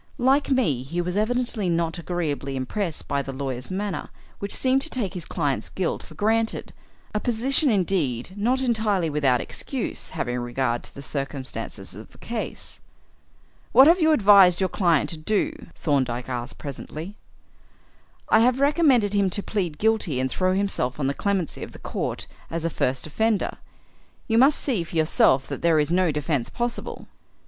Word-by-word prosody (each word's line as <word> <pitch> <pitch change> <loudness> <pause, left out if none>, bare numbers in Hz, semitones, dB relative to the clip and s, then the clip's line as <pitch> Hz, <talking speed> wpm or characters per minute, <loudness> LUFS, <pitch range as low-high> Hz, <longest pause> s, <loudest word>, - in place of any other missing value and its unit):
Like 270 +4 +3
me, 230 - +2
he 145 +7 -4
was 180 +1 -2
evidently 225 -2 0
not 165 0 0
agreeably 155 -6 -3
impressed 160 +7 -3
by 140 - 0
the 135 - -6
lawyer's 130 -2 -4
manner, 195 +1 -3 0.3
which 200 0 -4
seemed 265 +1 +2
to 320 - -1
take 220 - -2
his 180 -4 -6
client's 145 -6 -2
guilt 185 -3 -2
for - - -14
granted, 225 +2 0 0.4
a 210 - 0
position 255 +6 +2
indeed 180 - +1
not 245 +6 +1
entirely 215 -9 +1
without 135 -4 +2
excuse - - -4
having 125 0 -2
regard 120 0 -1
to - - -13
the 140 - -8
circumstances 130 -8 -5
of 105 +4 -11
the - - -17
case. 230 -1 -5 0.9
"What 265 - +9
have 335 +4 +5
you 320 0 +5
advised 200 - +6
your 190 -1 +1
client 170 -6 +2
to 165 - -4
do?" 215 - 0 0.2
Thorndyke 130 -5 -1
asked 125 +1 -4
presently. 155 +6 -7 1.1
"I 220 - +5
have 250 +3 +3
recommended 280 - +3
him 200 -2 +3
to 200 +3 -1
plead 180 -8 -2
guilty 215 -11 +1
and 130 0 -1
throw 185 0 +1
himself 190 -10 -1
on 140 - 0
the 135 - +1
clemency 195 -1 -2
of - - -7
the - - -10
court - - -4 0.2
as 165 0 -3
a 165 - 0
first 130 -2 -1
offender. 220 +7 0 0.7
You 225 -1 +3
must 275 +4 +6
see 230 - 0
for 170 - -10
yourself 155 -4 +3
that - - -5
there 165 -2 +3
is 150 +1 +1
no 180 -1 +3
defence 145 -3 -1
possible." 240 0 -4
180 Hz, 170 wpm, -24 LUFS, 140-220 Hz, 1.1 s, What